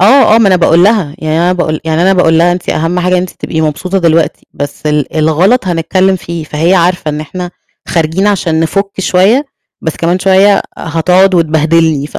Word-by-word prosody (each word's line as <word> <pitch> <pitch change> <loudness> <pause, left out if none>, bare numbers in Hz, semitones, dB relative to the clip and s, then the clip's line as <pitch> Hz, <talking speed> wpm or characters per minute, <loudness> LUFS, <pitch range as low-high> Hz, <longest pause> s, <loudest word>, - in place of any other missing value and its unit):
آه، 220 +3 +5
آه، - - +5
ما 210 -4 +3
أنا 185 - +3
باقول 170 0 +3
لها، 200 -9 +1
يعني 155 -1 -2
أنا 175 +1 +1
باقول 160 -4 -2
يعني 160 +1 0
أنا 190 +2 +3
باقول 165 -3 +2
لها 175 +1 +3
"أنتِ 175 0 -6
أهَم 165 +3 -1
حاجة 180 +1 -1
إن 180 - +2
أنتِ 185 - -5
تبقي 160 - -5
مبسوطة 180 +5 -2
دلوقتي 165 -2 0
بس 145 +1 -6
ال 150 0 -1
الغَلط 170 +9 +1
هنتكلّم 185 +2 0
فيه،" 170 -2 -7
فهي 160 +4 0
عارفة 180 -2 0
إن 150 0 -3
إحنا 175 +4 -7 0.4
خارجين 165 +4 0
عشان 170 -6 0
نِفُك 195 +5 -1
شوية، 200 +11 +2 0.4
بس 160 - -3
كمان 170 +2 -1
شوية 195 +2 +3 0.2
هتقعُد 180 +4 +1
وتبهدلني 160 -2 +1
ف - - -8
170 Hz, 195 wpm, -10 LUFS, 160-185 Hz, 0.4 s, آه